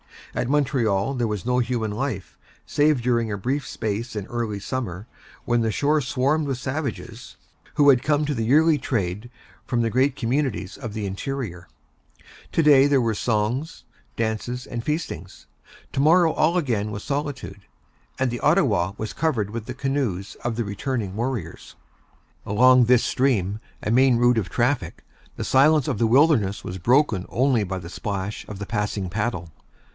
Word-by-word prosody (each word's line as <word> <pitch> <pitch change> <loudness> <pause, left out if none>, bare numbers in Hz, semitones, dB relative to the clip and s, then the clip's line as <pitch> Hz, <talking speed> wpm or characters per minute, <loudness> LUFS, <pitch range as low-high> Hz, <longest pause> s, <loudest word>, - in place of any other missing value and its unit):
At 125 - -2
Montreal 130 -6 +1
there 120 -3 -1
was 105 -1 -4
no 125 0 +2
human 115 -3 -1
life, 110 -3 -4 0.3
save 145 -3 +2
during 115 -2 +1
a 100 - -2
brief 135 +8 -2
space 110 +3 -4
in 105 -2 -3
early 115 -4 -3
summer, 100 -4 -4 0.4
when 120 -1 +2
the 110 -1 0
shore 150 +1 +2
swarmed 140 +5 0
with 135 -3 -2
savages, 130 -4 -5 0.4
who 145 -1 +5
had 130 -3 +5
come 150 +2 +1
to 150 - -1
the 115 -4 -2
yearly 155 +5 +4
trade 105 -3 -2 0.4
from 120 -2 0
the 115 -1 0
great 130 +3 +2
communities 125 -6 -1
of 120 -6 -7
the 105 -2 -3
interior. 100 -3 -5 0.9
To 165 - +3
day 140 -2 +6
there 140 -2 +3
were 115 -1 +1
dances, 115 +8 -1 0.3
songs, 115 +3 -2
and 120 -2 -4
feastings; 130 - -4 0.5
to - - -3
morrow 165 +3 +5
all 165 +4 +2
again 115 -10 0
was 105 0 -6
solitude, 140 - -4 0.5
and 130 -2 0
the 120 - -4
Ottawa 110 - +2
was 110 - -5
covered 135 -10 0
with 115 -1 -5
the 125 - -6
canoes 130 -9 -2
of 120 -1 -1
the 120 - -1
returning 100 -1 -3
warriors. 115 -7 -4 0.7
Along 125 +4 +5
this 125 0 +4
stream, 105 -7 +1 0.2
a 105 - -1
main 130 +1 +5
route 120 0 +3
of 100 - -4
traffic, 120 +3 -1 0.3
the - - -4
silence 145 +1 +4
of 105 - -1
the 115 - +3
wilderness 120 -6 +3
was 90 +1 -6
broken 115 - +2
only 125 -3 +2
by 95 -1 -4
the 85 -2 -8
splash 100 +1 -4
of 105 - -7
the 100 - -4
passing 105 -2 -2
paddle. 100 -4 -3
120 Hz, 170 wpm, -23 LUFS, 105-135 Hz, 0.9 s, day